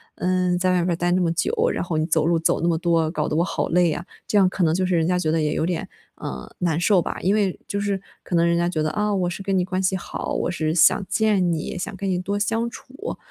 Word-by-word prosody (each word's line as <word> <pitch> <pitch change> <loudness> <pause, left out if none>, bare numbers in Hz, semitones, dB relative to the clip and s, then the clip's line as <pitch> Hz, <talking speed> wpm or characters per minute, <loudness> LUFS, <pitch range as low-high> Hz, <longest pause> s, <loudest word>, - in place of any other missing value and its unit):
嗯， 180 -1 +1
在 185 +1 +1
外 - - +2
边 180 - 0
儿 - - 0
待 175 +1 0
那 185 - +3
么 170 - +2
久， 175 - 0 0.2
然 - - -2
后 175 -3 -2
你 155 - +1
走 160 -2 +1
路 170 0 +2
走 160 - +1
那 170 - +1
么 165 - +1
多， 165 -2 +1
搞 150 -3 -1
得 - - -2
我 170 - +3
好 - - -2
累 175 0 +3
呀， 170 +3 -3 0.2
这 210 - +1
样 190 - +6
可 185 0 -1
能 160 -1 +3
就 185 +2 +1
是 180 -1 +1
人 165 -1 +2
家 180 0 +1
觉 155 -3 0
得 160 - +1
也 150 -1 0
有 - - 0
点， 175 -1 -2 0.3
呃， 65 -1 -7
难 165 -3 0
受 185 +1 +4
吧。 - - -4
因 190 - +2
为 200 -4 0
就 200 - -2
是 200 -1 -1 0.2
可 180 - -3
能 170 0 +4
人 170 - +2
家 170 0 +1
觉 160 -4 -1
得， 155 - +1
啊， 210 0 0
我 185 -3 0
是 175 - -6
跟 195 -1 0
你 180 - +1
关 185 0 -2
系 190 0 +1
好， 185 - -5
我 - - -1
是 155 -3 -1
想 170 +4 +5
见 195 -2 +2
你， 160 -2 -3
想 180 - -4
跟 195 0 -4
你 180 - +1
多 200 +3 -2
相 225 +3 0
处。 275 - -8
180 Hz, 315 characters per minute, -23 LUFS, 165-190 Hz, 0.3 s, 样